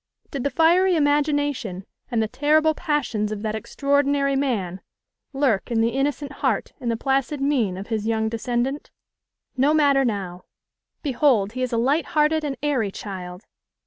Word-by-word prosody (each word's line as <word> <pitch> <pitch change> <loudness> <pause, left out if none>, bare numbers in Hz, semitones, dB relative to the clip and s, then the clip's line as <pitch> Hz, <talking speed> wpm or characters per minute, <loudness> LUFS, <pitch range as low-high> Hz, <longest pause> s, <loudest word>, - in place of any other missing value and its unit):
Did 275 -3 -3
the 280 - +1
fiery 345 +6 +4
imagination 290 - 0 0.2
and 230 -2 +1
the - - -1
terrible 305 +6 +2
passions 260 -10 -1
of 210 0 -5
that 215 -1 -1
extraordinary 280 +4 +1
man 210 -10 -1 0.5
lurk 270 -8 0
in 230 -2 0
the 225 +1 +3
innocent 280 +1 -1
heart - - 0
and 240 - -3
the 230 - 0
placid 270 +3 0
mien 255 -10 +1
of 195 +3 -8
his 220 -1 -2
young 220 -1 +1
descendant? 240 +5 -2 0.7
No 285 +4 +3
matter 280 -3 +4
now! 195 -7 -3 0.6
Behold, 255 -7 +2
he 255 +3 -5
is 255 - -1
a 235 - 0
light 275 +8 +1
hearted 305 +1 +3
and 280 -2 -3
airy 265 -8 +1
child! 185 -1 -8
265 Hz, 160 wpm, -23 LUFS, 220-290 Hz, 0.7 s, fiery